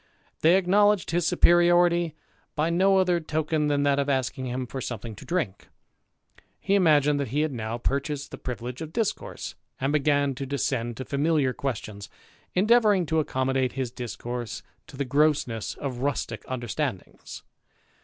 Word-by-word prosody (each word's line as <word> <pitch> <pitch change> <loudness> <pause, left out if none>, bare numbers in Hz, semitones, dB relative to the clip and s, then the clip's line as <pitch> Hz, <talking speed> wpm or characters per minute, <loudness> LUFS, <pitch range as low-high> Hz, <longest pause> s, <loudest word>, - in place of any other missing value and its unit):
They 170 +4 +5
acknowledged 200 0 +3
his 170 -1 +1
superiority 175 -1 +4 0.4
by 160 +2 +1
no 190 +3 +4
other 180 -2 +3
token 155 -1 -1
than 145 -1 +1
that 140 -1 +2
of 140 0 0
asking 130 -1 -1
him 125 +1 -3
for 130 +2 -6
something 115 -2 -5
to - - -12
drink. 155 - -2 0.9
He 195 - -1
imagined 150 -6 +4
that 140 - -1
he 145 +6 0
had 155 -1 0
now 115 -1 -3
piur 135 +3 0
chased 140 -2 -5
the - - -8
privilege 125 +1 -6
of 160 -1 -7
discourse, 225 -3 -3 0.3
and 135 +2 0
began 145 -1 +2
to 135 +2 -5
descend 130 -4 -2
to 130 - -5
familiar 145 -2 +1
questions, 105 -7 -5 0.5
endeavouring 210 -1 +4
to 160 0 +1
accommodate 130 -3 0
his 130 -3 -3
discourse 120 0 -5 0.2
to 135 - -12
the 140 - -1
grossness 140 -5 +1
of 130 -4 -5
rustick 130 -4 -2
understandings. 120 -5 -5
140 Hz, 155 wpm, -26 LUFS, 125-165 Hz, 0.9 s, They